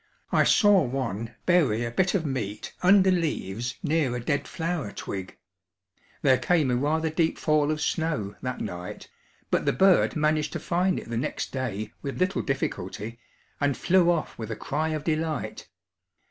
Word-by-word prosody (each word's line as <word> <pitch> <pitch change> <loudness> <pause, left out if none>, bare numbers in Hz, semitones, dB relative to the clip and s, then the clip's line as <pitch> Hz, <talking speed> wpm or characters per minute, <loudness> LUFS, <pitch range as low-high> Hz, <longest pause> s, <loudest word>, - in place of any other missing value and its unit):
I - - +4
saw 205 -4 +5
one 115 - -3
bury 140 -11 +3
a 115 - -3
bit 185 - +1
of 170 -5 0
meat 110 -7 -4
under 190 +1 +6
leaves 125 - -1
near 145 -5 +1
a - - -2
dead 140 +4 -1
flower 165 -9 -3
twig; 95 -2 -6 0.9
there 130 -2 +5
came 160 -8 +2
a - - +2
rather 155 +5 0
deep 160 0 +1
fall 150 -1 +2
of 155 0 0
snow 150 - -1
that 125 -1 -4
night, 90 +1 -6 0.4
but - - +1
the - - +4
bird 190 -1 +4
managed 155 0 +1
to - - -3
find 180 +2 +1
it - - -10
the 115 - -1
next 120 - -3
day 115 -6 -3
with 140 -2 -4
little 185 +2 +1
difficulty 115 -4 -3 0.4
and 145 -2 +1
flew 180 -1 +4
off 170 -7 -1
with 110 -1 -5
a 110 - -3
cry 155 +8 -2
of 155 -2 -2
delight. 155 -2 -2
150 Hz, 170 wpm, -26 LUFS, 120-165 Hz, 0.9 s, under